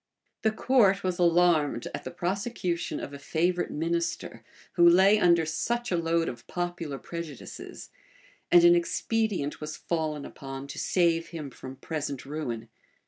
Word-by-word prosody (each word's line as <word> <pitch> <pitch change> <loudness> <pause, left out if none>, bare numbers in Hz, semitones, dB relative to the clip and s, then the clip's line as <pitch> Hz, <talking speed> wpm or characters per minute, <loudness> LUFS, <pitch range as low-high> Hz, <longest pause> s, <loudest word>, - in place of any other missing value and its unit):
The 220 - +3
court 215 -3 +3
was 185 -1 -1
alarmed 170 -7 +3
at - - -6
the - - -3
prosecution 180 0 -2
of 140 - -7
a 140 - -8
favorite 175 +5 0
minister, 170 +2 -2 0.3
who 170 -1 +6
lay 190 +4 +6
under 170 -4 +4
such 235 +9 -2
a - - +2
load 165 0 +1
of 120 -2 -7
popular 175 -5 -3
prejudices; 165 -3 -8 0.6
and 175 -1 +8
an 175 0 +8
expedient 180 -2 0
was 150 0 -5
fallen 155 -3 -2
upon 135 0 -8
to - - -6
save 165 -2 +2
him 155 -5 -7
from 130 +1 -9
present 145 -1 -4
ruin. 125 -6 -4
170 Hz, 145 wpm, -28 LUFS, 150-180 Hz, 0.6 s, and